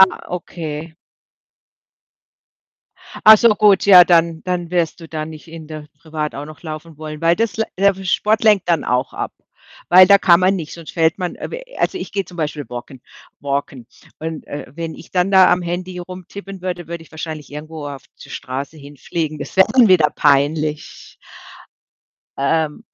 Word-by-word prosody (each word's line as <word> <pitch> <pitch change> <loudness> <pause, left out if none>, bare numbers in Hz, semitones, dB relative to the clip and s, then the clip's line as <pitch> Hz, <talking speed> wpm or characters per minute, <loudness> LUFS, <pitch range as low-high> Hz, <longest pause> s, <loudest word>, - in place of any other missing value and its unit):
Ah, 190 -1 +6
okay. 165 -3 -6 2.3
Ach 220 0 +10
so 230 -1 +4
gut, 205 -2 +4
tja, 185 -3 +8
dann 165 -2 +2
dann 180 -2 -3
wirst 175 -1 -1
du 165 - -11
da 155 -1 -4
nicht 155 0 -11
in 160 -1 -10
der 155 -1 -9
privat 155 0 -5
auch 140 - -6
noch 155 +2 -13
laufen 155 0 -8
wollen, 155 0 -7
weil 165 +1 +3
das 225 0 -2
l 220 - +2
der 200 0 +4
Sport 215 +4 +1
lenkt 210 -5 +4
dann 165 -3 +1
auch 125 +1 -1
ab. - - -4 0.6
Weil 185 +1 +9
da 200 - +7
kann 175 -2 +5
man 190 +1 +3
nicht, 160 -4 -6
sonst 165 -2 -10
fällt 160 +2 +1
man, 180 -1 -3
äh 485 - -6 0.2
also, 375 - 0
ich - - -7
gehe 195 -1 -1
zum 180 0 -14
Beispiel 150 -2 -3
walken 125 +1 -9 0.4
walken. 140 -3 -4 0.3
Und, 160 0 -6
äh, 145 - -7
wenn 165 0 -5
ich - - -14
dann 180 +1 +1
da 190 -2 +6
am 180 - +1
Handy 180 +1 -5
rumtippen 185 +2 -9
würde, 175 -3 -5
würde 170 -1 -6
ich 160 - -19
wahrscheinlich 160 -1 -7
irgendwo 155 0 -8
auf 140 -2 -8 0.2
die - - -16
Straße 135 +4 -6
hinfliegen. 150 +2 -5
Das - - -8
wär 190 - +7
dann 245 -3 +6
wieder 170 -5 +4
peinlich. 150 +2 0 1.2
Ähm, 155 +7 -1
165 Hz, 180 wpm, -19 LUFS, 150-185 Hz, 2.3 s, Ach